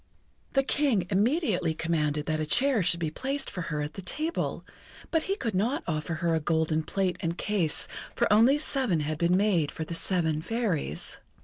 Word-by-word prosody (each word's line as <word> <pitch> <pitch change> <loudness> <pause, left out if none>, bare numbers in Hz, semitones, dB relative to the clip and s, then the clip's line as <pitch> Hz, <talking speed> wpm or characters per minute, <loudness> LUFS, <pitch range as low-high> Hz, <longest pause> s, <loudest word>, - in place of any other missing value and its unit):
The 270 - +3
King 265 -10 +1
immediately 205 - +1
commanded 150 -2 0
that 155 -1 -1
a 155 - 0
chair 260 - +3
should 170 -1 +2
be 160 -3 -1
placed 270 - -2
for 180 - -4
her 150 -1 -1
at 150 +2 -4
the 195 - -7
table, 310 - -2 0.5
but 325 - +3
he 390 - +2
could 235 - -3
not 220 +9 0
offer 160 0 -2
her 170 +1 0
a 160 - +2
golden 160 0 +1
plate 185 +3 -1
and 170 -1 -2
case, 190 -8 0 0.3
for - - +2
only 235 +7 +6
seven 265 - +1
had 155 +1 -3
been 175 +1 +3
made 190 -7 +2
for 160 - -4
the 165 - -6
seven 165 -3 0
Fairies. 180 - -2
180 Hz, 190 wpm, -28 LUFS, 160-235 Hz, 0.5 s, only